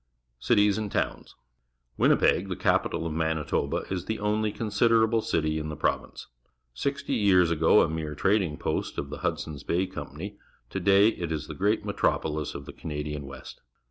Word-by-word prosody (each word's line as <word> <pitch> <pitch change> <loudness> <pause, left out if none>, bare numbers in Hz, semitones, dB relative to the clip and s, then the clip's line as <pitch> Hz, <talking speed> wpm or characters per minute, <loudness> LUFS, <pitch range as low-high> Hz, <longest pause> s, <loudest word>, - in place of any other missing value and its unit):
Cities 105 - +3
and 105 -2 -4
Towns. - - -2 0.3
— - - -33
Jlj«mp££^ 95 - +3
the 90 - -2
capital 80 - +1
of 80 - -2
M 80 - -3
anit 80 -2 -1
oba, - - 0
is 90 -2 -2
the 110 - -2
only 105 +1 0
considerable 115 +1 +2
city 80 -5 0
in 75 0 -4
the 75 - -5
province. - - -2 0.5
Sixty 140 - -2
years 95 -7 +4
ago 80 +5 +5
a - - +1
mere 80 -1 -4
trading 95 -2 +1
post - - -2
of 70 0 -4
the 75 - -6
Hudson's 75 -3 -3
Bay 90 +5 0
Company, 95 +5 -8 0.3
to 95 - -2
day 100 +3 +5
it 85 -7 -4
is 80 - -2
the - - -7
great - - 0
metropoUs 75 -1 -1
of 70 - -7
the - - -9
Cana 75 -2 -5
dian 75 -2 -5
West. 70 - -10
85 Hz, 185 wpm, -27 LUFS, 75-105 Hz, 0.5 s, ago